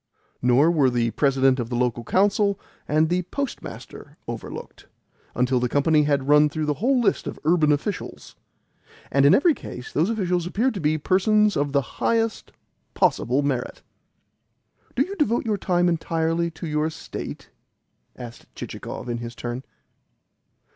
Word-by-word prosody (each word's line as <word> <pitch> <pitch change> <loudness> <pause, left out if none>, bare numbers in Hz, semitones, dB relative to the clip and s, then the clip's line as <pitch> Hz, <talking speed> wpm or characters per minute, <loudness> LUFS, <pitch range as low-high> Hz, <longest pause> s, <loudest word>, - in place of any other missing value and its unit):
Nor 125 +6 +4
were 145 -6 +3
the 120 -2 0
President 135 -1 +2
of 120 -1 -3
the 120 - -3
Local 120 -1 0
Council 200 - +2 0.3
and 155 +2 +3
the 180 +2 +1
Postmaster 280 -3 -6
overlooked; - - -8 0.5
until 125 0 +2
the 125 0 0
company 150 +3 +3
had 140 -2 0
run 150 +1 +5
through 155 +1 -3
the 150 - +1
whole 260 +2 +3
list 235 - +1
of - - -5
urban 155 -1 +3
officials. 160 +7 -4 0.8
And 140 +1 +4
in - - +7
every 325 +3 +4
case 125 - -9
those 160 +7 +2
officials 180 -6 -1
appeared 235 +8 0
to 200 - -5
be 155 -1 +1
persons 210 +6 +2
of 145 0 0
the 140 0 +2 0.2
highest 225 -1 0 0.4
possible 130 +4 +2
merit. 130 -3 -3 1.1
"Do - - +3
you 395 - -6
devote 240 -7 +1
your 210 -3 0
time 175 -1 +1
entirely 165 0 0
to 165 +1 -9
your 150 0 0
estate?" 160 - -8 0.6
asked 120 -1 -10
Chichikov, - - -7
in 120 -1 -3
his 120 0 -7
turn. 120 +2 -5
155 Hz, 155 wpm, -24 LUFS, 135-190 Hz, 1.1 s, in